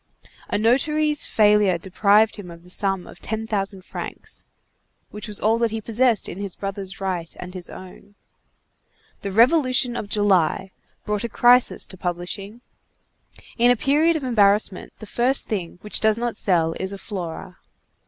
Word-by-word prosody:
A - - 0
notary's 295 +7 +1
failure 210 -4 +4
deprived 205 +5 +2
him 195 -4 -9
of 170 0 -12
the 180 - -10
sum 195 -2 -1
of - - -13
ten 220 0 -4
thousand 195 -3 -3
francs, - - -8 0.7
which 210 +2 -7
was 210 -1 -2
all 225 +2 +2
that 235 -1 +2
he 225 +1 -4
possessed 230 +1 +1
in 185 - -7
his 200 -3 -5
brother's 195 -1 -6
right 180 -4 -3
and 180 0 -8
his 180 -2 -6
own. 190 +2 -12 1.1
The 200 - -4
Revolution 250 - +3
of 205 - -5
July 195 -2 +1 0.3
brought 210 0 -2
a 235 - -3
crisis 245 +3 +4
to 190 - -12
publishing. 185 +5 -5 1.0
In 240 +1 +5
a 245 - +5
period 300 +7 +2
of 310 - -3
embarrassment, 205 -5 +2
the - - -10
first 245 +5 +1
thing 180 -6 -4
which 210 - +1
does 220 0 +2
not 240 0 -2
sell 165 -4 +2
is 190 0 -3
a 200 - -6
_Flora. 185 -2 -7
205 Hz, 165 wpm, -22 LUFS, 190-235 Hz, 1.1 s, In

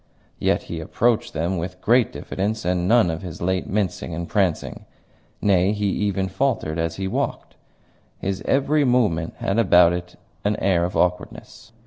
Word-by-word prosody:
Yet - - +1
he - - -6
approached 120 -1 0
them 85 +3 -1
with 90 +2 -6
great 120 0 +3
diffidence 105 +1 -3
and 90 0 0
none 115 -5 +4
of 80 - -5
his 90 -4 -8
late 95 +1 -1
mincing 90 -4 -2
and 85 +1 -4
prancing. 95 -5 -1 0.6
Nay, 95 0 +3
he 105 -1 -2
even 95 -1 -1
faltered 95 - -1
as 80 0 -1
he 95 +1 -3
walked; - - -3 0.6
his 95 0 -3
every 145 +2 +2
movement 110 - +1
had 100 +4 -1
about 90 -5 +5
it 90 0 -5 0.3
an 105 +1 +1
air 90 -4 +1
of 90 - -3
awkwardness. 90 +4 -2
95 Hz, 160 wpm, -22 LUFS, 90-105 Hz, 0.6 s, about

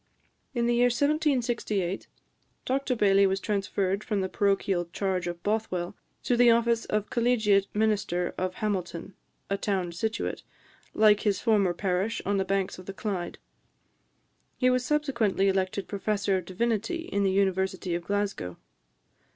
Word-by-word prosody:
In 235 -1 +1
the 240 - +2
year 240 +1 +4
1768, 245 - 0 0.6
Dr 265 0 0
Baillie 200 -2 +4
was 190 0 0
transferred 195 -1 -1
from 205 -3 -1
the 190 - -2
parochial 195 -3 +1
charge 185 -2 -1
of 175 0 -5
Bothwell 205 -3 -1 0.3
to 245 - +2
the 240 0 +6
office 235 0 +3
of 210 -1 -2
collegiate 220 -5 +3
minister 205 -5 0
of 185 0 -2
Hamilton, 185 -4 -3 0.4
a 200 - +1
town 190 -4 -1
situate, 220 +6 -3 0.5
like 210 -1 +5
his 205 -2 0
former 200 -6 +2
parish, 195 +4 -1
on 200 +1 +1
the 190 - +2
banks 195 -1 -1
of 185 - -12
the 195 - -5
Clyde. 190 -4 -4 1.2
He 255 -1 +3
was 250 0 +1
subsequently 250 -9 +1
elected 190 0 0
Professor 200 0 0
of 185 -2 -2
Divinity 225 - -1
in 200 - 0
the 195 - +3
University 190 -1 0
of 170 0 -2
Glasgow. 200 - -2
200 Hz, 145 wpm, -27 LUFS, 190-225 Hz, 1.2 s, the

